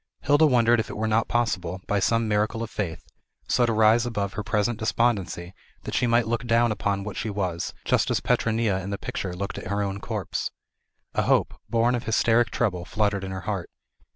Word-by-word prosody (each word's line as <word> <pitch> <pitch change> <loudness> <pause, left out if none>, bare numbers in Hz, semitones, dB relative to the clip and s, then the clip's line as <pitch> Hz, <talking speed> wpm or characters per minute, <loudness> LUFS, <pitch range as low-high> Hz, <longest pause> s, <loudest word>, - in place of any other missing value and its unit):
Hilda 145 +3 +5
wondered 120 -3 +4
if 110 - -2
it - - -6
were 110 - -1
not 110 +1 +2
possible, 95 -7 -1
by 105 - +1
some 115 +4 +2
miracle 110 +2 0
of 115 - -7
faith, 85 -5 -4 0.4
so 120 -1 +3
to - - +1
rise 110 +1 +4
above 100 -5 -2
her 105 - -3
present 110 +1 0
despondency 105 -6 0 0.3
that - - -6
she 125 - +2
might 120 0 +3
look 120 +1 -2
down 115 0 +3
upon 100 -2 -1
what 105 0 -6
she 110 - -3
was, 95 -4 -3
just - - +2
as - - +1
Petronilla 110 -4 +1
in 95 - -6
the 100 - -2
picture 90 -2 -4
looked 100 +2 -4
at - - -8
her 100 +2 0
own 100 0 -3
corpse. - - -3 0.6
A - - +1
hope, - - +2 0.2
born 115 +1 +2
of 120 - -2
hysteric 115 +1 +3
trouble, 95 -8 -1
fluttered 100 0 0
in 95 - -4
her 95 0 -5
heart. 95 -3 -3
110 Hz, 210 wpm, -25 LUFS, 100-115 Hz, 0.6 s, Hilda